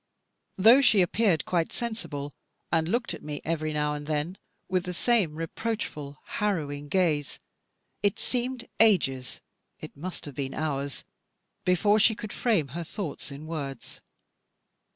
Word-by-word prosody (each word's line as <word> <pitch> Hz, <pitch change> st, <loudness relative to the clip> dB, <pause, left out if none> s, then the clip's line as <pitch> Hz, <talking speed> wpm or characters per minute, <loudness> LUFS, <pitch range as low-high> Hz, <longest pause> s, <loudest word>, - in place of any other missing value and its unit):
Though 225 Hz, +8 st, +8 dB
she 215 Hz, -8 st, +6 dB
appeared 185 Hz, -2 st, +2 dB
quite 170 Hz, -2 st, 0 dB
sensible, 150 Hz, -, -4 dB, 0.4 s
and 160 Hz, -1 st, +2 dB
looked 235 Hz, +3 st, 0 dB
at -, -, -7 dB
me, 150 Hz, -1 st, -5 dB
every 155 Hz, -1 st, -1 dB
now 150 Hz, -1 st, 0 dB
and 145 Hz, 0 st, -6 dB
then, 155 Hz, +5 st, -1 dB, 0.3 s
with 185 Hz, 0 st, 0 dB
the 180 Hz, -1 st, -4 dB
same 205 Hz, -8 st, +2 dB
reproachful 160 Hz, -4 st, -4 dB
harrowing 145 Hz, -8 st, -2 dB
gaze, 155 Hz, -6 st, +1 dB, 0.6 s
it 200 Hz, -1 st, +2 dB
seemed 250 Hz, 0 st, -1 dB
to -, -, -12 dB
me -, -, -28 dB
ages, 135 Hz, -, +3 dB, 0.4 s
it -, -, -9 dB
must 180 Hz, +6 st, -6 dB
have 145 Hz, -, -7 dB
been 135 Hz, 0 st, -4 dB
hours, 140 Hz, -3 st, -2 dB, 0.6 s
before 205 Hz, +4 st, +4 dB
she 220 Hz, +1 st, +5 dB
could 215 Hz, -1 st, -7 dB
frame 200 Hz, -, +1 dB
her 170 Hz, +6 st, -4 dB
thoughts 170 Hz, -2 st, -5 dB
in 140 Hz, +2 st, -8 dB
words. 145 Hz, -4 st, -6 dB
165 Hz, 150 wpm, -28 LUFS, 145-210 Hz, 0.6 s, Though